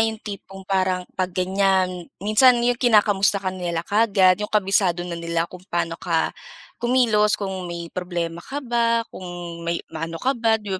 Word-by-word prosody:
yung 225 Hz, 0 st, +1 dB
tipong 195 Hz, -2 st, -8 dB
parang 185 Hz, -1 st, 0 dB
'pag 185 Hz, -1 st, -1 dB
ganyan, 185 Hz, -1 st, +1 dB
minsan 235 Hz, +5 st, +4 dB
yung 245 Hz, 0 st, +1 dB
kinakamusta 210 Hz, -4 st, +4 dB
ka 190 Hz, -2 st, -2 dB
nila 175 Hz, -2 st, -3 dB
kaagad, 200 Hz, -3 st, +3 dB
yung 210 Hz, -, -2 dB
kabisado 190 Hz, -4 st, +2 dB
na 170 Hz, -1 st, -5 dB
nila 170 Hz, 0 st, -1 dB
kung 180 Hz, -, -10 dB
paano 170 Hz, -2 st, -2 dB
ka 170 Hz, -3 st, 0 dB, 0.5 s
kumilos, 235 Hz, -4 st, +3 dB
kung 190 Hz, -3 st, -4 dB
may 170 Hz, -1 st, -6 dB
problema 170 Hz, -2 st, -3 dB
ka 280 Hz, +9 st, -6 dB
ba, 230 Hz, -1 st, +1 dB
kung 175 Hz, -2 st, -7 dB
may 170 Hz, 0 st, -3 dB
maano 165 Hz, +1 st, -4 dB
ka 260 Hz, +10 st, 0 dB
ba, 230 Hz, -3 st, +2 dB
'di 210 Hz, -3 st, -7 dB
190 Hz, 165 wpm, -23 LUFS, 175-215 Hz, 0.5 s, minsan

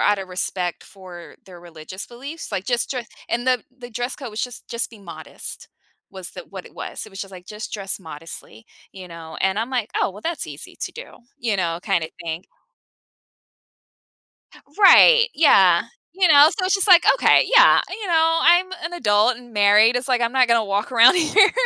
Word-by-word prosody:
out 205 Hz, -1 st, +2 dB
a 195 Hz, -, -7 dB
respect 180 Hz, -1 st, -4 dB
for 185 Hz, -3 st, -14 dB
their 180 Hz, -2 st, -14 dB
religious 170 Hz, +2 st, -10 dB
beliefs, 275 Hz, +7 st, -10 dB
like, 195 Hz, -3 st, -4 dB
just 240 Hz, -1 st, -2 dB
dre 250 Hz, -4 st, -5 dB, 0.2 s
and 240 Hz, +2 st, -3 dB
the 255 Hz, -3 st, +1 dB, 0.2 s
the 245 Hz, -1 st, -10 dB
dress 245 Hz, +2 st, -5 dB
code 265 Hz, -6 st, -9 dB
was 215 Hz, -, -5 dB
just 250 Hz, -1 st, -8 dB
just 235 Hz, 0 st, -4 dB
be 225 Hz, -, -15 dB
modest 165 Hz, -5 st, -11 dB, 0.4 s
was 190 Hz, -1 st, -8 dB
tha 180 Hz, -, -10 dB
what 190 Hz, -2 st, -9 dB
it -, -, -18 dB
was, -, -, -8 dB
it -, -, -14 dB
was 195 Hz, 0 st, -10 dB
just, 195 Hz, -, -8 dB
like, 180 Hz, -1 st, -13 dB
just 210 Hz, +1 st, -9 dB
dress 195 Hz, -1 st, -5 dB
modestly, 155 Hz, -, -12 dB, 0.3 s
you 185 Hz, -1 st, -12 dB
know, 165 Hz, -2 st, -11 dB
and 190 Hz, +1 st, 0 dB
I'm 230 Hz, +4 st, -3 dB
like, 245 Hz, -5 st, -3 dB
"Oh, -, -, 0 dB
well, 200 Hz, +2 st, -13 dB
that's 335 Hz, +7 st, -5 dB
easy -, -, -11 dB
to -, -, -5 dB
do," -, -, -12 dB, 0.2 s
you 225 Hz, -4 st, -2 dB
know, 170 Hz, -2 st, -2 dB
kinda 160 Hz, -3 st, -2 dB, 0.2 s
thing. 165 Hz, +2 st, -5 dB, 2.4 s
Right, 470 Hz, +4 st, +7 dB
yeah. 190 Hz, -, +4 dB, 0.3 s
You 375 Hz, 0 st, +1 dB
know, 295 Hz, -2 st, +7 dB
so 370 Hz, -, -1 dB
it's 375 Hz, +2 st, +1 dB
just 390 Hz, +1 st, 0 dB
like, 360 Hz, -2 st, +7 dB
"Okay, -, -, +3 dB
yeah, -, -, +6 dB
you 430 Hz, -3 st, -7 dB
know, 330 Hz, -1 st, +2 dB
I'm 350 Hz, +2 st, +4 dB, 0.2 s
an 340 Hz, -, -5 dB
adult 220 Hz, -5 st, +1 dB
and 240 Hz, -1 st, -16 dB
married," 210 Hz, +2 st, +4 dB
it's 250 Hz, +2 st, -3 dB
like, 250 Hz, -2 st, +1 dB
"I'm 235 Hz, 0 st, -1 dB
not 255 Hz, -2 st, +3 dB
gonna 230 Hz, -1 st, +2 dB
walk 200 Hz, +1 st, -3 dB
around 240 Hz, +1 st, +6 dB
here 395 Hz, +5 st, +4 dB
220 Hz, 200 wpm, -21 LUFS, 185-265 Hz, 2.4 s, Right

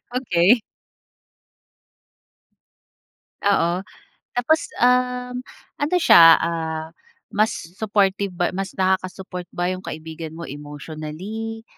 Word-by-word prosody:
Okey. 225 Hz, -2 st, +3 dB, 2.8 s
Oo. 185 Hz, -2 st, +2 dB, 0.5 s
Tapos, 310 Hz, +6 st, +2 dB, 0.2 s
um, 250 Hz, 0 st, +2 dB, 0.4 s
ano 300 Hz, +4 st, 0 dB
siya, 165 Hz, -, +8 dB
ah, 160 Hz, -1 st, -2 dB, 0.4 s
mas 215 Hz, +1 st, +2 dB, 0.3 s
supportive 200 Hz, -2 st, +1 dB
ba 175 Hz, 0 st, 0 dB
mas 195 Hz, 0 st, -3 dB
nakaka-support 185 Hz, -1 st, -1 dB
ba 175 Hz, +1 st, -1 dB
yung 185 Hz, 0 st, -5 dB
kaibigan 160 Hz, 0 st, -7 dB
mo 170 Hz, -, -7 dB
emotionally, 155 Hz, +10 st, -7 dB
185 Hz, 85 wpm, -22 LUFS, 165-225 Hz, 2.8 s, siya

